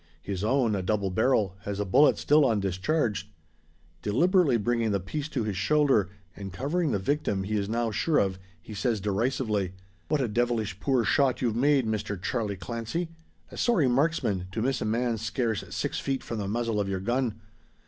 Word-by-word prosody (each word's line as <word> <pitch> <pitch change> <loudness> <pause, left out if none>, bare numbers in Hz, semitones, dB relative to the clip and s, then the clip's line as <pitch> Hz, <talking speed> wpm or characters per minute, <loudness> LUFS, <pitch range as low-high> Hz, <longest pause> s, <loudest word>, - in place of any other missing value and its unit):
His 95 -1 -4
own, 115 -1 +2
a 95 - -1
double 100 0 0
barrel, 100 -2 +2
has 100 0 -5
a 105 - 0
bullet 140 +10 +5
still 150 +1 +4
undischarged. 105 - 0 0.7
Deliberately 160 - +3
bringing 115 +1 0
the 100 -1 +1
piece 140 - -4
to 135 -6 -2
his 105 -2 -2
shoulder, 120 - +3 0.3
and 100 -1 -7
covering 150 - -1
the 110 - +1
victim 100 -2 -1
he 105 +3 -2
is 100 -1 -1
now 115 0 0
sure 150 +9 +1
of, 95 -2 +1 0.2
he 110 - -11
says 110 +2 0
derisively, 105 -1 -1 0.3
"What 150 - +1
a 130 - +1
devilish 110 -3 -1
poor 130 -2 +2
shot 135 0 +2
you've 115 -3 +1
made, 135 +1 +3
Mister 105 -2 -2
Charlie 105 +2 -2
Clancy! 115 - -4 0.4
A - - -10
sorry 215 - +3
marksman 125 - +1
to 110 - -1
miss 130 -1 0
a - - -1
man 115 +1 0
scarce 115 -1 -1
six - - -2
feet 135 -1 -2
from 115 - -4
the 100 - -3
muzzle 115 0 -1
of 100 -1 -1
your 95 -1 -1
gun! 120 +1 -1
115 Hz, 185 wpm, -27 LUFS, 100-135 Hz, 0.7 s, bullet